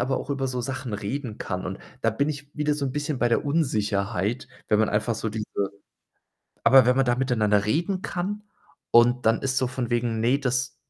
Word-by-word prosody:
aber 130 +1 0
auch - - -7
über 135 -1 -1
so 125 -1 -2
Sachen 125 -2 -4
reden 110 +3 -4
kann, 95 -1 -4
und 95 +1 -5 0.2
da 115 - +3
bin 140 +7 0
ich 145 -1 -6
wieder 150 0 +1
so 145 -1 -2
'n 130 - -3
bisschen 145 -1 -2
bei 120 - +2
der 115 - +1
Unsicherheit, 105 - 0 0.2
wenn 105 - +3
man 110 - +2
einfach 110 +2 0
so 110 0 -3
diese 105 0 -4 1.2
aber 130 +1 +7
wenn 125 - +4
man 135 - +4
da 120 0 +1
miteinander 110 -6 +2
reden 175 - 0
kann 205 +4 -3 0.5
und 120 0 +5
dann 115 0 +3
ist 135 0 +1
so 130 - +1
von 125 -1 -4
wegen: 115 -2 0
„Ne, 125 +4 +3
das” 125 -1 -1
125 Hz, 210 wpm, -25 LUFS, 110-140 Hz, 1.2 s, aber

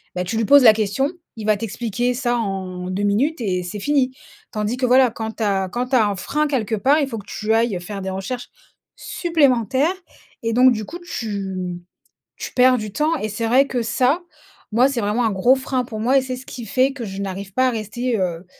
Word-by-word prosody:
bah, 180 - -1
tu 225 +5 -2
lui 225 - +1
poses 285 +4 +7
la 220 -3 +9
question, 220 +8 0 0.3
il 215 - -6
va 215 - +4
t'expliquer 230 +3 -2
ça 245 -1 0
en 185 -4 -4
2 195 +2 -2
minutes 245 +11 +1
et 185 -4 -1
c'est 180 +4 -6
fini. 265 +1 +1 0.4
Tandis 215 +2 -2
que 255 - 0
voilà, 255 -1 +5
quand 220 -1 -5
tu 225 - -2
as 195 -2 0
quand 245 +5 -3
tu 265 - +1
as 220 -3 +4
un 205 - -1
frein 300 +10 -1
quelque 240 -6 -1
part, 275 +9 +3
il 285 - +1
faut 230 -4 -5
que 205 - -13
tu 215 +1 -1
ailles 225 -5 +1
faire 200 +2 -6
des 190 - -4
recherches 240 +6 -5 0.5
supplémentaires 280 - +1 0.5
et 230 - 0
donc 255 +2 +6
du 215 -1 -4
coup 330 - -8
tu, 205 - -4
mmh, 180 -1 -4 0.6
tu - - -6
perds 255 0 +5
du 215 -3 -5
temps 310 +2 +1
et 215 - -3
c'est 225 +2 -2
vrai 265 +4 +4
que 245 -2 -1
ça, 255 +8 +1 0.5
moi 245 +5 +4
c'est 255 -4 -2
vraiment 210 +4 0
un 220 - +1
gros 220 +8 +4
frein 260 -1 -2
pour 220 -2 -7
moi 255 +5 +3
et - - +4
c'est 255 -1 -5
ce 255 - -11
qui 240 -2 -8
fait 260 +5 +2
que 255 - -7
je 195 0 -6
n'arrive 195 0 -5
pas 255 +3 +3
à - - -1
rester, 230 +2 -2
heu, 175 -1 -2
230 Hz, 235 wpm, -21 LUFS, 205-255 Hz, 0.6 s, la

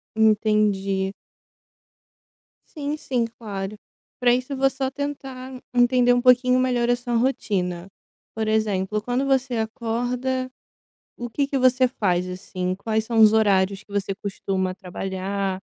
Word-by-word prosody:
Entendi. 210 -3 +2 1.6
Sim, 295 0 -3
sim, 250 -6 -1
claro. 210 -3 -6 0.4
Pra 245 -1 +4
isso 255 +3 -1
vou 270 +1 +4
só 265 0 -2
tentar 265 -2 -6
entender 245 0 +4
um 245 0 +3
pouquinho 250 0 +5
melhor 245 -2 +1
a 245 - +4
sua 245 0 -5
rotina. 190 -8 -1 0.5
Por 220 -1 -2
exemplo, 210 -2 0
quando 245 +5 -1
você 265 -3 +1
acorda, 245 +3 -2 0.7
o 240 0 -5
que 280 +4 -1
que 275 - 0
você 255 0 +4
faz, 185 -6 0
assim? 185 0 -4
Quais 220 +1 -1
são 230 0 -1
os 215 0 +8
horários 195 -2 +2
que 210 - -29
você 200 -1 -1
costuma 190 -1 -2
trabalhar, 190 +1 -4
225 Hz, 135 wpm, -23 LUFS, 195-255 Hz, 1.6 s, os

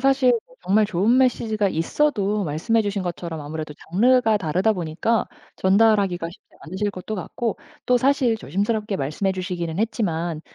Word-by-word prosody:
사실 270 -1 +4 0.2
뭐 - - -22
정말 210 +2 +3
좋은 210 +7 +2
메시지가 220 -5 +2
있어도 205 - 0
말씀해 180 +10 +1
주신 205 -2 -2
것처럼 170 -2 -5
아무래도 150 0 -6 0.2
장르가 225 +3 +4
다르다 185 +4 +1
보니까 180 +6 -1 0.3
전달하기가 195 -3 +3
쉽지 - - -18
않으실 190 +5 -3
것도 185 +4 -6
같고 225 +5 -3 0.3
또 250 - +4
사실 260 -3 +2
조심스럽게 210 - -2
말씀해 155 +7 -1
주시기는 180 -2 -4
했지만 175 -8 -1
200 Hz, 380 characters per minute, -23 LUFS, 175-225 Hz, 0.3 s, 사실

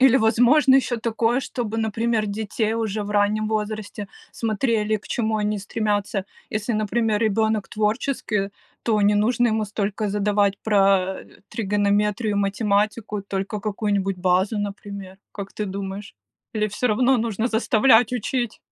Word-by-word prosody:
Или 265 0 +6
возможно 245 +5 +5
еще 255 -2 +2
такое, 230 +1 0
чтобы, 230 -4 -4
например, 225 0 0
детей 215 +1 -2
уже 220 -2 -2
в 205 - -6
раннем 210 +1 +2
возрасте 210 -1 -3 0.2
смотрели, 220 -1 0
к 210 - -13
чему 220 -2 -1
они 210 0 -1
стремятся. 205 -1 -1 0.3
Если, 215 +2 -2
например, 215 0 0
ребенок 220 -1 +1
творческий, 210 -2 -1 0.3
то 220 -2 +1
не 205 +1 +4
нужно 235 +3 +2
ему 220 0 0
столько 205 0 -2
задавать 205 -1 +1
про, 195 -3 +2
э, - - -20
тригонометрию 210 +1 0
и - - -1
математику, 205 +1 0
только 200 +1 -4
какую-нибудь 200 -2 -1
базу, 185 +4 +1
например. 200 -2 -6 0.2
Как 200 -1 -7
ты 210 - -2
думаешь, 195 +1 -6 0.4
или 215 0 +1
всё 215 +5 -1
равно 250 +4 +3
нужно 225 0 -1
заставлять 225 +1 +4
учить? 240 0 -2
210 Hz, 140 wpm, -23 LUFS, 200-225 Hz, 0.4 s, Или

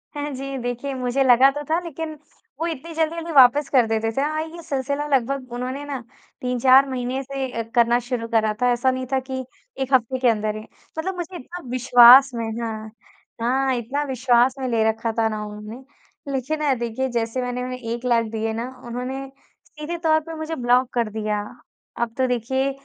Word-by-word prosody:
हाँ 290 0 -3
जी, 270 +1 -5
देखिए 245 +3 -3
मुझे 255 +1 0
लगा 260 +1 +6
तो 295 +1 -5
था 325 +2 +2
लेकिन, 320 -1 -5 0.5
वो 330 - -1
इतनी 330 +1 -6
जल्दी-जल्दी 325 +1 -1
वापस 275 +1 +6
कर 250 -5 +4
देते 225 0 0
थे। - - +3
हाँ 310 +2 -1
ये 330 +1 -9
सिलसिला 280 +1 -2
लगभग 255 0 -2
उन्होंने 255 +3 -4
ना 280 -3 -4 0.4
3-4 255 +2 +4
महीने 255 +1 -2
से 265 -3 -4
करना 235 0 +4
शुरू 240 -1 -4
करा 220 -2 +1
था, 250 - +4
ऐसा 245 +2 +2
नहीं 255 0 -3
था 265 - +3
कि 260 0 -5 0.4
1 265 +1 -2
हफ्ते 260 +1 +2
के 255 - +2
अंदर 215 -1 0
ही। 215 - -6 0.4
मतलब 370 +4 -2
मुझे 350 +1 -5
इतना 350 +6 -9
विश्वास 250 +1 +8
में 230 -1 -3 0.2
हाँ, 220 -1 -5 0.5
हाँ! 265 +3 +1
इतना 255 +5 -2
विश्वास 255 0 +3
में 260 - -2
ले 230 -2 +1
रखा 225 +1 -2
था 225 - +3
ना 215 -1 -4
उन्होंने 210 +4 -9 0.5
लेकिन 275 +4 -2
ना 290 -3 +2
देखिए 240 +2 -2
जैसे 230 +1 -1
मैंने 250 0 -3
उन्हें 255 0 -5
1 235 +1 -5
लाख 235 -2 +3
दिए 225 0 -2
ना 230 +2 -3 0.2
उन्होंने 255 +3 -4 0.4
सीधे 305 +3 -6
तौर 315 -1 +4
पे 325 - -6
मुझे 315 +1 -4
ब्लॉक 245 0 +2
कर 235 -3 0
दिया। 215 -1 -2 0.6
अब 235 -1 -1
तो 260 -1 +2
देखिए 265 +3 0
255 Hz, 190 wpm, -23 LUFS, 235-275 Hz, 0.6 s, विश्वास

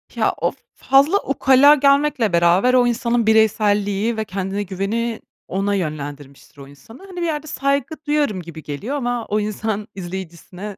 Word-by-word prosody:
Ya, - - +1
o - - +1 0.2
fazla 280 +8 +3
ukala 275 +1 +5
gelmekle 280 -6 +2
beraber, 175 +9 +3
o 245 -1 +4
insanın 235 -1 0
bireyselliği 210 0 +2
ve 220 - -2
kendine 195 +1 -3
güveni 210 +5 -3 0.3
ona 200 +2 -1
yönlendirmiştir 145 -5 -6
o 140 - -11
insanı. 225 - -15
Hani, 370 - -12
bir - - 0
yerde 310 -2 -3
saygı 280 +1 -1
duyarım 290 -11 0
gibi 165 -2 -10
geliyor 200 - -5
ama 245 -4 -2
o 210 - -1
insan 215 0 -3
izleyicisine 185 +2 -8
215 Hz, 150 wpm, -20 LUFS, 190-265 Hz, 0.3 s, ukala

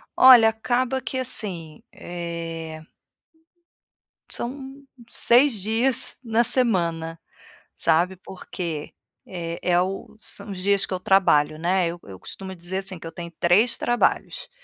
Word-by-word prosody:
Olha, 250 -4 +8
acaba 245 +4 -1
que 260 - -4
assim, 185 -11 -4
eh 165 -2 -6 1.5
são 270 +2 -7 0.3
6 240 -3 +4
dias 235 +5 +1
na 230 0 +2
semana, 170 -10 0 0.6
sabe, 170 +3 +2
porque 175 -4 -7 0.3
é 170 -2 -6
é 175 -1 +2
o 190 +3 -5
são 215 - -12
os 195 - -6
dias 200 +2 +1
que - - -5
eu 185 - -2
trabalho, 180 -6 +3
né, 180 +1 +1
eu 170 +1 -5
eu 95 -2 -11
costumo 190 - -9
dizer 175 +2 -5
assim, 190 -1 -6
que - - -11
eu - - -7
tenho 170 0 -8
3 205 +8 +3
trabalhos, 240 - 0
190 Hz, 130 wpm, -23 LUFS, 170-235 Hz, 1.5 s, Olha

